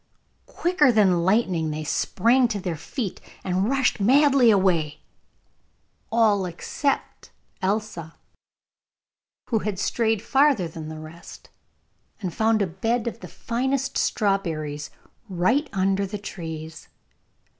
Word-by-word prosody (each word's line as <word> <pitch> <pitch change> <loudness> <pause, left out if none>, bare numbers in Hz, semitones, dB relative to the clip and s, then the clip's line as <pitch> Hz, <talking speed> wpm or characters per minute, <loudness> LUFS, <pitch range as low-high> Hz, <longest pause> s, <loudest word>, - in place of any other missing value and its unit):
Quicker 340 -6 +2
than 190 -6 +3
lightning 185 -5 +1
they 155 0 -4
sprang 235 - +2
to 215 -3 -3
their 180 -3 -3
feet, 195 - -5 0.2
and 190 +3 0
rushed 270 -3 +1
madly 270 +3 +5
away, 175 -7 +2 1.1
all 215 -4 +3
except 225 - -3 0.3
Elsa, 190 -5 -2 1.4
who 225 - +3
had 210 -2 -3
strayed 220 +2 0
farther 270 - +3
than 160 -1 -8
the 155 - -7
rest, 155 +2 -12 0.7
and 185 -5 -3
had - - -16
found 220 -1 +2
a - - +1
bed 225 +7 -1
of 230 -1 -4
the - - -9
finest 265 +3 -2
strawberries 160 -8 -1 0.4
right 230 - +1
under 195 0 0
the 210 +2 -5
trees. 160 -5 -8
200 Hz, 120 wpm, -24 LUFS, 170-235 Hz, 1.4 s, madly